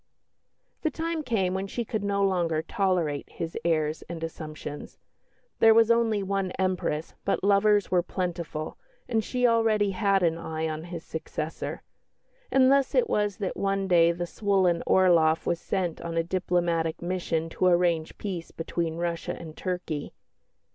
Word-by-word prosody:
The 315 - +1
time 325 +1 -3
came 210 -10 0
when 190 +1 -2
she 235 +4 -3
could 215 -2 -3
no 200 0 +1
longer 170 -5 +1
tolerate 180 -9 0
his 165 0 -6
airs 155 -2 0
and 165 -1 -6
assumptions. 155 -2 -7 0.6
There 225 0 +7
was 230 0 +5
only 225 -3 +2
one 195 -1 -1
Empress, 185 -4 -1
but 195 - 0
lovers 205 0 +3
were 180 -1 +4
plentiful, 170 -4 -4 0.3
and 225 -2 +1
she 250 +3 0
already 225 -3 +3
had 195 0 +2
an 165 -1 +1
eye 160 -1 -3
on 155 +1 -4
his 175 -2 -7
successor. 160 0 -5 0.7
And 265 0 +5
thus 275 -1 +3
it 485 -2 +3
was 205 -2 +1
that 195 -3 -3
one 195 0 0
day 170 -2 +5
the 175 +1 -3
swollen 185 -3 +1
Orloff 165 -4 +4
was 170 -1 0
sent 180 -4 -2
on 165 0 -4
a 165 - +3
diplomatic 170 -2 0
mission 170 -2 -2
to 185 - +1
arrange 175 -3 +2
peace 180 -5 -5
between 165 0 -3
Russia 170 -1 -3
and 160 -2 -9
Turkey. 180 -5 -4
180 Hz, 155 wpm, -27 LUFS, 165-200 Hz, 0.7 s, There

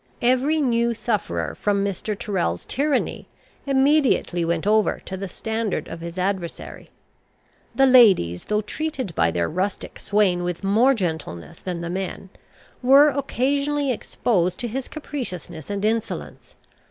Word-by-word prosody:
Every 260 +6 +3
new 235 -4 +1
sufferer 220 -1 -2
from 200 -1 0
Mr. 200 +2 -3
Tyrrel's 135 - -2
tyranny 285 0 -1 0.4
immediately 270 - +2
went 170 +1 -1
over 215 +1 +2
to 190 - -5
the 195 0 -5
standard 220 +1 -3
of 165 - -8
his 170 +1 -7
adversary. 185 -2 -4 0.9
The 270 - +5
ladies, 205 - +5
though 210 0 0
treated 260 - -4
by 85 - +2
their 85 0 0
rustic 185 +4 -3
swain 200 -4 +2
with 175 +1 -3
more 230 +8 +4
gentleness 160 - -4
than 175 -2 -5
the 170 - -4
men, 190 0 -5 0.5
were 275 +4 +7
occasionally 280 +1 0
exposed 185 -6 0
to 240 - -2
his 255 +3 -4
capriciousness 185 - -6
and 200 0 -2
insolence. 225 0 -3
210 Hz, 135 wpm, -23 LUFS, 180-255 Hz, 0.9 s, were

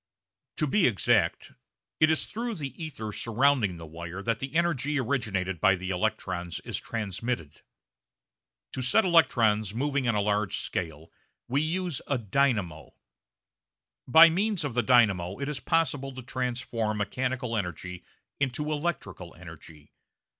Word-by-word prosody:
To - - +2
be 175 +6 +3
exact, 105 -5 +1 0.5
it 155 - +5
is 160 - +2
through 230 +1 -4
the 150 0 -6
ether 110 -9 -5
surrounding 115 -4 +1
the 85 - -9
wire 85 +4 -7
that 115 0 0
the 135 +4 -6
energy 150 -4 +1
originated 100 - -1
by 95 -2 +5
the 95 +1 -5
electrons 90 -1 -2
is - - -4
transmitted. 105 - -4 1.1
To 130 - -3
set 130 - +3
electrons 115 - +3
moving 140 0 0
on 115 - +2
a 105 - +2
large 105 -1 0
scale 80 -1 -5 0.4
we 135 +4 +1
use 175 -1 -2
a 140 - +1
"dynamo." 105 - -1 1.1
By 160 +5 +9
means 200 +1 0
of 140 - -3
the 120 - +2
dynamo 105 -7 +3
it 140 +1 -4
is 150 -2 -3
possible 145 -5 0
to 130 - -7
transform 120 -3 -2
mechanical 125 +3 -2
energy 90 -2 -4 0.4
into 140 +3 -1
electrical 145 - -4
energy. 80 -3 -13
120 Hz, 140 wpm, -28 LUFS, 95-140 Hz, 1.1 s, By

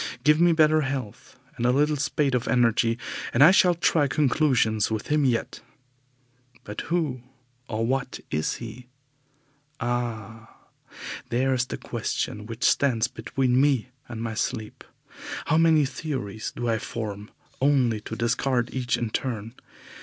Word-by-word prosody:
Give 150 +2 +4
me 175 0 +6
better 155 -1 +4
health 135 -6 -5 0.2
and - - -3
a 125 - +4
little 150 +3 +2
spate 140 0 0
of 125 -1 0
energy, 115 -2 +2 0.4
and 130 - +7
I 165 - +9
shall 180 -2 +5
try 160 -3 +2
conclusions 130 -7 +2
with 110 -1 -3
him 150 0 +2
yet. 120 -3 -1 1.0
But 105 0 -6
who 155 -8 0 0.5
and 115 +1 -1
what 135 0 -2
is 75 +1 -1
he? 120 +2 -9 0.9
Ah! 115 -2 -4 0.7
there 130 +3 +1
is 125 -1 0
the - - -5
question 105 0 -3
which 115 +1 -6
stands 125 -5 +3
between 130 -1 0
me 135 -4 +2 0.2
and 115 -1 -5
my 115 -1 -3
sleep. 110 -1 -3 0.6
How 155 - +3
many 160 -3 +5
theories 130 -7 -4
do 120 - -3
I 115 -1 +1
form, 105 -2 -6 0.3
only 130 -6 +2
to 110 - -6
discard 120 +1 0
each 125 -1 0
in 115 -2 -3
turn! 115 -3 -3
125 Hz, 145 wpm, -25 LUFS, 115-140 Hz, 1.0 s, I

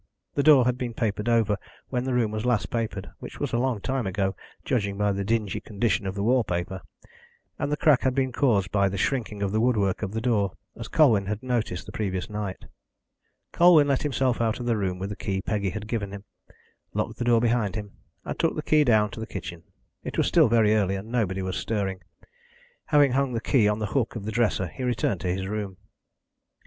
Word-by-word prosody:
The 145 - +1
door 140 -4 +6
had 125 0 0
been 120 -3 -4
papered 110 -1 -1
over 110 -3 +2 0.3
when 125 -1 -1
the 130 - -1
room 115 -3 +1
was 110 0 -3
last 110 -7 0
papered, 110 -5 -3
which - - -9
was - - -3
a 120 - +2
long 125 -3 0
time 130 -3 -1
ago, 95 0 -1 0.3
judging 100 -5 -1
by 105 0 +2
the 100 0 -2
dingy 110 -1 -1
condition 105 -1 -1
of 95 - -3
the 100 - -2
wall 125 +2 +3
paper, 90 0 -3 0.8
and 145 - -1
the 150 - 0
crack 150 -5 +4
had 130 -1 +1
been 130 -1 +1
caused 110 -8 +1
by 100 -1 +2
the 100 - -4
shrinking 105 -2 -1
of 100 - -1
the 110 +1 +1
woodwork 105 -6 +1
of 100 -3 -3
the 115 - -1
door, 105 -5 +1 0.2
as 115 -1 -7
Colwyn 110 -11 +4
had 105 +3 -3
noticed 115 -8 -2
the - - -9
previous 95 -2 -3
night. 105 -3 -5 0.9
Colwyn 170 -4 +6
let 135 - +2
himself 130 -4 0
out 115 0 0
of 120 - -5
the 120 -1 +2
room 95 -3 -1
with 95 +2 -4
the - - -4
key 95 -2 -2
Peggy 100 0 -1
had 105 +2 -6
given 110 -4 -3
him, 100 0 -8 0.7
locked - - -2
the 120 - -1
door 120 -1 +4
behind 115 -3 +1
him, 105 -2 -5 0.3
and - - -5
took - - +1
the - - -3
key 155 -1 +4
down 110 -5 +3
to - - -8
the 110 - -5
kitchen. 85 -3 -7 0.4
It - - -5
was - - +3
still - - +5
very 110 -2 +4
early, 100 -3 +1
and 100 +4 -7
nobody 95 -6 0
was 95 0 -3
stirring. 95 -4 -2 0.8
Having 145 -3 +4
hung 135 0 +1
the 115 - 0
key 115 -2 +3
on 105 0 +1
the 110 - -2
hook 125 -4 0
of 105 -3 -5
the 110 - -3
dresser, 110 -4 +1
he 90 - -9
returned 120 -7 0
to 90 - -1
his 95 +1 -2
room. 100 -2 -4
110 Hz, 225 wpm, -26 LUFS, 100-125 Hz, 0.9 s, door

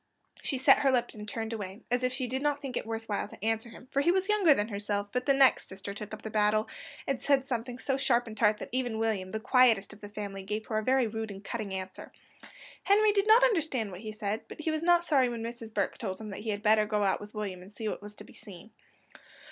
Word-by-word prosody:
She 270 - 0
set 260 - +6
up - - -2
her 275 - +4
lip 250 -2 +1
and 210 -1 -7
turned 225 +1 -4
away, 205 0 -6
as 245 0 +2
if 255 - +2
she 255 0 -2
did 260 +2 -3
not 290 0 +1
think 270 -3 -6
it - - -3
worth 225 0 -4
while 205 -1 -2
to 210 - -9
answer 225 +1 0
him, 245 - -13
for 280 - +2
he 340 - +4
was 380 +2 0
younger 410 -6 +5
than 210 -1 -1
herself; 205 0 -2
but 250 +2 -2
the 275 - +6
next 270 -1 +4
sister 195 +1 -7
took 210 0 -7
up 215 0 -8
the 220 - -5
battle, 215 0 +2 0.4
and 275 -2 -2
said 275 -2 +2
something 245 -2 -3
so 270 +1 -1
sharp 255 -3 +2
and 220 -2 -8
tart, 210 0 +3
that - - -7
even 245 -3 -1
William, 220 -4 -1
the 220 - -3
quietest 230 -4 +4
of 210 - -16
the 205 - -8
family, 205 -2 -6
gave 210 +3 -4
her 215 -1 -1
a - - -4
very 260 +1 +3
rude 220 0 -4
and 200 0 -9
cutting 215 -1 -4
answer. 190 0 -6 0.7
Henry 420 +1 +4
did 405 0 +1
not 450 +3 +7
understand 315 - +1
what 180 +1 -8
he 215 -1 -6
said, 215 0 -3
but - - -9
he 315 - 0
was 310 0 -1
not 345 0 +4
sorry 270 -6 +3
when 235 -1 -4
Mrs. 230 -1 -7
Burke 200 -3 -1
told 190 +1 -4
him 215 -2 -7
that - - -6
he 220 - -5
had 205 0 -3
better 215 0 +4
go 210 -1 +1
out 195 -1 +1
with 210 +1 -11
William 195 -4 -4
and 185 +3 -13
see 220 +1 -5
what - - -3
was 210 0 -10
to - - -10
be - - -16
seen. 205 0 -12
225 Hz, 275 wpm, -30 LUFS, 210-260 Hz, 0.7 s, not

